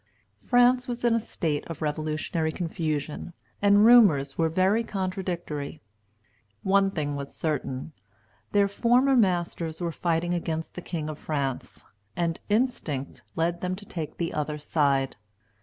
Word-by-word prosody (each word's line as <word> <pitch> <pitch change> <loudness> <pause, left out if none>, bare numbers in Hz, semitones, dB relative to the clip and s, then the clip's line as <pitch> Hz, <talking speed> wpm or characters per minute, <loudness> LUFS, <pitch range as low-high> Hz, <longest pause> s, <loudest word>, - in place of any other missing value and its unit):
France 250 +1 +4
was 245 -1 -4
in 240 -1 +4
a 230 - +3
state 155 -8 -2
of 165 -2 -6
revolutionary 155 +1 -1
confusion, 160 -2 -3 0.3
and 205 +1 +6
rumors 175 - +6
were 165 -1 +2
very 190 +7 +2
contradictory. 180 -7 -4 0.8
One 195 0 +4
thing 150 -6 -2
was 140 0 -6
certain, 150 -2 -3 0.6
their 200 -1 +4
former 245 +6 +3
masters 175 -6 +1
were 170 -2 -1
fighting 170 +1 0
against 165 -2 -3
the 180 - -6
king 160 -3 -4
of 155 -1 -6
France; 140 -4 -3 0.3
and 170 -1 -1
instinct 205 - -1
led 170 +1 0
them 185 0 -1
to 205 +2 -11
take 160 -6 -6
the 170 -1 -2
other 150 0 -2
side. 140 -4 +1
170 Hz, 140 wpm, -27 LUFS, 155-200 Hz, 0.8 s, and